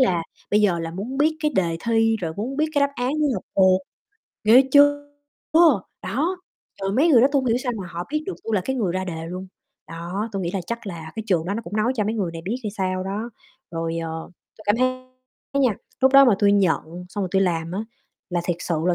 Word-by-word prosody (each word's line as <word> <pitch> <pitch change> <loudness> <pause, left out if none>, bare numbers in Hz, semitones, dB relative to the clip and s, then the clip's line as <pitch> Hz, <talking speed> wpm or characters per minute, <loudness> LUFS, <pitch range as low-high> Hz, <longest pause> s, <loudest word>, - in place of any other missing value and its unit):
là 180 -10 +3 0.3
bây 210 - +4
giờ 180 -4 +3
là 165 0 -4
muốn 230 +9 -5
biết 310 +2 +3
cái 300 -1 0
đề 170 -3 +1
thi, 225 -1 +3
rồi 165 -2 -3
muốn 250 +7 -3
biết 310 - +2
cái 285 - +3
đáp 280 0 +2
án 250 +3 -1
để 300 - +3
học - - -4
thuộc, 190 -1 +5 0.6
ghê 235 +5 +8
chưa? 290 0 +5 1.0
Đó, 285 - -1 0.5
rồi 195 0 0
mấy 295 +9 +3
người 250 -7 +7
đó 265 - +5
tui 280 - +4
hông 260 - -4
hiểu 230 0 +3
sao 250 -1 -2
mà 185 - -6
họ 170 +1 -5
biết 305 - 0
được 385 - -3
tui 225 - -1
là 200 - +2
cái 265 - -1
người 195 -8 0
ra 185 0 -2
đề 165 -3 -5
luôn. 185 +2 -6 0.4
Đó, 175 +6 -4
tui 195 -2 -2
nghĩ 170 - -2
là 195 - -1
chắc 235 -2 -5
là 160 -4 -7
cái 220 - -3
trường 175 -6 +1
đó 200 - -1
nó 230 - -3
cũng 205 +3 -6
nói 220 +4 +2
cho 210 - +1
mấy 220 +2 -1
người 190 -6 -2
này 165 0 -7
biết 230 +5 -1
hay 210 - -1
sao 185 -2 -2
đó. 210 +5 -4 0.4
Rồi, 165 0 -3
ờ, 160 0 -5 0.3
tui - - -12
cảm 205 +2 +3
thấy 255 +1 0 0.6
nha, 230 -7 +2 0.2
lúc 265 +1 +4
đó 275 0 +9
mà 235 -6 +5
tui 200 -1 +4
nhận 180 -2 0
xong 205 +2 -4
rồi 185 - -2
tui 195 0 +3
làm 165 -2 -1
á 195 - -2 0.5
là 175 -1 0
thiệt 175 -1 -1
sự 170 - -1
là 180 - +3
205 Hz, 255 wpm, -23 LUFS, 175-250 Hz, 1.0 s, đó